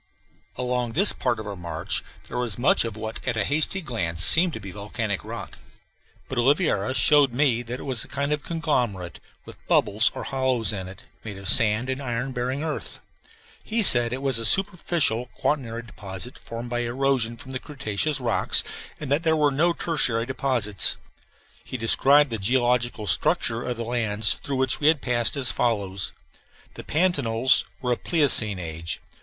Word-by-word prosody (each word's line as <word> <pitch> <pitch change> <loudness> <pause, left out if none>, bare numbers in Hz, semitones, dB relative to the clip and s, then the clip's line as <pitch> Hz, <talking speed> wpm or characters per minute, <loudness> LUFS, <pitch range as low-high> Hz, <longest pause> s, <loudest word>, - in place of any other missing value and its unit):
Along 125 -2 -2
this 195 +6 +6
part 120 -3 -2
of 110 - -7
our 100 -1 -6
march 85 -2 -4 0.2
there 125 - -5
was 120 -4 0
much 120 -1 +2
of 110 -2 -6
what 110 0 -7
at 120 -3 -1
a 105 - +1
hasty 155 +6 +2
glance 85 - +3
seemed 170 - +8
to - - -6
be 100 -2 -9
volcanic 105 +1 -4
rock; - - -9 0.7
but 130 - -4
Oliveira 130 - +1
showed 145 -3 +4
me 125 -3 +1
that 120 +2 -7
it - - -9
was 130 -5 0
a - - -10
kind 140 +1 -2
of 150 - -3
conglomerate, 125 - -3 0.3
with - - -14
bubbles 105 +3 +2
or - - -6
hollows 130 -6 0
in 95 -2 -6
it, 95 - -12 0.2
made 105 -3 -8
of 95 0 -9
sand 110 +1 +3
and 130 +1 -4
iron 125 0 -4
bearing 130 +3 -3
earth. 160 -1 -6 0.6
He 225 0 0
said 120 -9 +5
it 130 +2 -5
was 135 -4 +1
a - - -3
superficial 170 - +2
quaternary 120 -5 -2
deposit 100 +1 -8
formed 115 +1 -8
by 120 - -1
erosion 120 -1 -1
from 130 0 -11
the 130 - -4
cretaceous 135 0 -3
rocks, 125 - +1 0.4
and 145 -3 -7
that 145 +3 +2
there 160 -1 +1
were 150 -1 +2
here 135 - -6
no 175 +2 +3
tertiary 125 -10 0
deposits. 120 -6 +1 0.7
He 130 - -6
described 140 +5 +3
the 115 - -3
geological 120 +1 0
structure 115 +3 +1
of 125 -1 -4
the 115 - -5
lands 110 -3 +2
through 140 - -6
which 130 -1 +1
we 150 - +1
had 155 -1 +4
passed 120 -1 0
as 130 -3 0
follows: 100 -5 -1 0.6
The - - -10
pantanals 135 -8 +1 0.2
were 125 - -1
of 120 - -3
Pleistocene 130 - +2
age. 85 -1 -5
125 Hz, 180 wpm, -24 LUFS, 110-140 Hz, 0.7 s, seemed